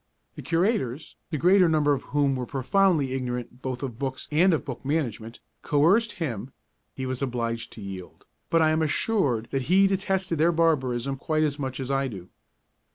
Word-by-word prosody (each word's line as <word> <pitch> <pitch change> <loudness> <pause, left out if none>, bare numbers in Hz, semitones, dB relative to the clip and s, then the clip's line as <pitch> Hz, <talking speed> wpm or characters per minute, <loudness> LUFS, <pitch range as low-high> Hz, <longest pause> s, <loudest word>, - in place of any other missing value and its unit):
The - - -9
Curators, 165 - -1
the 155 - -2
greater 180 +3 +5
number 150 -2 +3
of 140 - -2
whom 145 -2 +1
were 125 -2 -4
profoundly 145 - +2
ignorant 125 -1 -4
both 130 0 -4
of 125 -4 -5
books 135 -2 -4
and 175 +5 +4
of 160 - 0
book 130 -4 -6
management, 120 -6 -3 0.2
coerced 190 +11 +3
him; 130 - -4 0.4
he 130 - -4
was 130 0 -3
obliged 115 -3 -2
to 110 - -10
yield, 95 -2 -9 0.2
but 165 -1 +4
I 155 - +4
am 155 +1 +1
assured 145 - 0
that 135 0 -2
he 195 +2 +6
detested 190 -3 0
their 165 +2 +4
barbarism 135 -6 +1
quite 155 +3 0
as 145 -1 -1
much 130 -1 -4
as 130 0 -3
I 135 0 +1
do. 95 -7 -9
140 Hz, 180 wpm, -26 LUFS, 125-165 Hz, 0.4 s, he